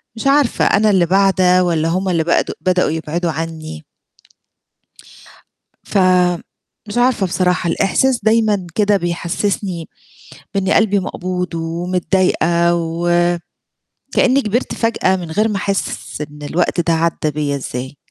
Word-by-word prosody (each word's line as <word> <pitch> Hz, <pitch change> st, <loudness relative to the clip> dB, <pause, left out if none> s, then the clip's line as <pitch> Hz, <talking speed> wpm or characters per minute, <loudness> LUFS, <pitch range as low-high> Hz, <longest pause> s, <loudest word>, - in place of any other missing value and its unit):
مش 225 Hz, -, -3 dB
عارفة 280 Hz, -2 st, +3 dB
أنا 215 Hz, +1 st, +3 dB
اللي 185 Hz, -4 st, +3 dB
باعدة، 185 Hz, 0 st, +3 dB
والّا 165 Hz, -2 st, 0 dB
هُم 185 Hz, +2 st, -1 dB
اللي 165 Hz, -2 st, +1 dB
بد 170 Hz, -, +1 dB
بدأوا 180 Hz, -2 st, +1 dB
يبعدوا 160 Hz, +2 st, -2 dB
عني؟ 155 Hz, -, -6 dB, 2.0 s
فمش 185 Hz, +3 st, -1 dB
عارفة 245 Hz, -5 st, +2 dB
بصراحة 180 Hz, -1 st, 0 dB
الإحساس 240 Hz, +8 st, +1 dB
دايمًا 215 Hz, -4 st, +2 dB
كده 205 Hz, -1 st, +3 dB
بيحسسني 175 Hz, 0 st, -3 dB, 0.7 s
بإني 195 Hz, -1 st, +1 dB
قلبي 205 Hz, -2 st, +3 dB
مقبوض 180 Hz, -1 st, -4 dB
ومتضايقة، 170 Hz, 0 st, +1 dB
و 175 Hz, +1 st, +1 dB, 0.8 s
كأني 265 Hz, +2 st, +3 dB
كبرت 225 Hz, +4 st, -1 dB
فجأة 230 Hz, -5 st, +1 dB
من 175 Hz, -3 st, -7 dB
غير 215 Hz, +7 st, +1 dB
ما 210 Hz, -, -2 dB
أحِسّ 195 Hz, -5 st, -3 dB
إن 150 Hz, 0 st, -8 dB
الوقت 170 Hz, +4 st, 0 dB
ده 170 Hz, 0 st, +1 dB
عدى 165 Hz, -1 st, 0 dB
بيّا 145 Hz, -1 st, -2 dB
إزاي. 130 Hz, +1 st, -6 dB
180 Hz, 125 wpm, -17 LUFS, 165-200 Hz, 2.0 s, عارفة